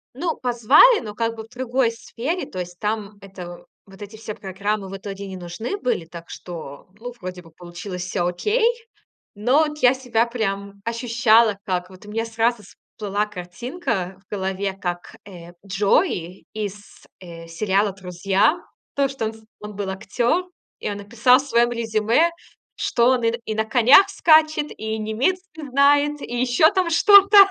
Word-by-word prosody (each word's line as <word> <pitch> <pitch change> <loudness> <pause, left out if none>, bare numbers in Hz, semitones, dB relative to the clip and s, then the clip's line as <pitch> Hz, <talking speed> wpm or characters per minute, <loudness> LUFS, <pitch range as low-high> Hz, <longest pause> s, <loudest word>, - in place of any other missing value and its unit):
Ну, 325 +4 -2
позвали, 255 - +5
но 210 -1 -8
как 230 0 -1
бы 220 - -7
в - - -16
другой 250 -1 0
сфере. 250 +9 -4
То 185 - -8
есть 180 0 -6
там 210 -1 -3
это, 180 -3 -10 0.2
вот 195 +1 -16
эти 205 +2 -10
все 215 -1 -7
программы 200 +1 -3
в 195 - -6
итоге 195 0 -7
не 190 -1 -7
нужны 180 - -5
были, 245 - -2
так 170 0 -11
что, 160 -5 -9
ну, 245 +2 -6
вроде 180 0 -7
бы 165 - -17
получилось 175 +2 -8
всё 180 -1 -1
окей. 420 - 0 0.7
Но 250 +9 +3
от 300 0 -5
я 255 -3 +5
себя 245 -3 0
прям 200 -4 -4
ощущала, 230 -2 +3
как 180 -2 -2
вот 185 +1 -15
у - - -10
меня 225 +2 -2
сразу 225 0 0
всплыла 205 0 -5
картинка 200 - -5
в - - -68
голове, 190 0 -2
как, 175 -2 -5
э, 175 -3 -12
Джой 195 - 0
из, 205 -1 -5 0.4
э, 170 -2 -10
сериала 195 +3 0
"Друзья". 190 - +1 0.4
То, 280 -1 +1
что 270 -4 -4
он 220 - -4
с 220 - -17 0.2
он 210 0 -8
был 200 -1 -4
актёр, 240 - -1 0.3
и - - -3
он 205 - -4
написал 235 +5 +3
в 270 - -3
своём 240 -1 +3
резюме, 230 +7 +1 0.5
что 235 +1 +2
он 255 -2 +1
и 230 - +3
на 235 - -2
и 215 - -2
на 220 - 0
конях 250 - +6
скачет, 310 -4 +4
и 220 0 -4
немецкий 310 - -2
знает, 285 +2 +3
и 240 - -5
ещё 255 +5 +4
там 375 -4 0
что-то. 400 +4 +6
220 Hz, 170 wpm, -22 LUFS, 190-250 Hz, 0.7 s, конях